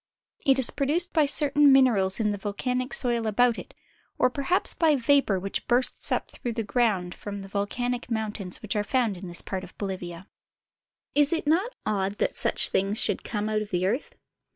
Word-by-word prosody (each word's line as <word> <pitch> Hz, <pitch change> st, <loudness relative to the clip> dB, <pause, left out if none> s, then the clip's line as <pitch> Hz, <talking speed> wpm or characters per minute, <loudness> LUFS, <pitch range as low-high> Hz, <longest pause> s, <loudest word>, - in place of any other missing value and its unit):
It 270 Hz, -1 st, +5 dB
is 260 Hz, -3 st, +6 dB
produced 315 Hz, +6 st, +1 dB
by 310 Hz, -3 st, +3 dB
certain 290 Hz, 0 st, +5 dB
materials 230 Hz, -8 st, +4 dB
in 210 Hz, -2 st, +1 dB
the 205 Hz, -, -4 dB
vol 205 Hz, 0 st, -4 dB
canic 250 Hz, +2 st, -2 dB
soil 235 Hz, -3 st, 0 dB
about 235 Hz, +2 st, +2 dB
it, -, -, -12 dB, 0.4 s
or 255 Hz, -, +2 dB
perhaps 280 Hz, +8 st, +2 dB
by 315 Hz, -3 st, +2 dB
vapor 265 Hz, -6 st, +2 dB
which 195 Hz, +2 st, -5 dB
bursts 245 Hz, +1 st, +1 dB
up -, -, -2 dB
through 240 Hz, -, -5 dB
the 225 Hz, 0 st, -3 dB
ground 200 Hz, -5 st, 0 dB
from 200 Hz, -1 st, -8 dB
the 195 Hz, -, -9 dB
volcanic 240 Hz, +5 st, -3 dB
mountains 215 Hz, -5 st, -4 dB
which 215 Hz, +1 st, -3 dB
are 210 Hz, -, 0 dB
found 230 Hz, -2 st, 0 dB
in 185 Hz, +1 st, -9 dB
this 175 Hz, 0 st, -9 dB
part 190 Hz, -1 st, -5 dB
of -, -, -13 dB
Bolivia. 185 Hz, -2 st, -6 dB, 0.9 s
Is 290 Hz, 0 st, +3 dB
it 330 Hz, -2 st, -1 dB
not 360 Hz, +11 st, 0 dB
odd 200 Hz, -2 st, -1 dB
that -, -, -1 dB
such -, -, +2 dB
things 195 Hz, +3 st, -1 dB
should -, -, +1 dB
come 210 Hz, -2 st, -3 dB
out 215 Hz, 0 st, -1 dB
of 210 Hz, -, -6 dB
the 180 Hz, -1 st, -1 dB
earth 235 Hz, +9 st, -2 dB
225 Hz, 200 wpm, -26 LUFS, 200-265 Hz, 0.9 s, is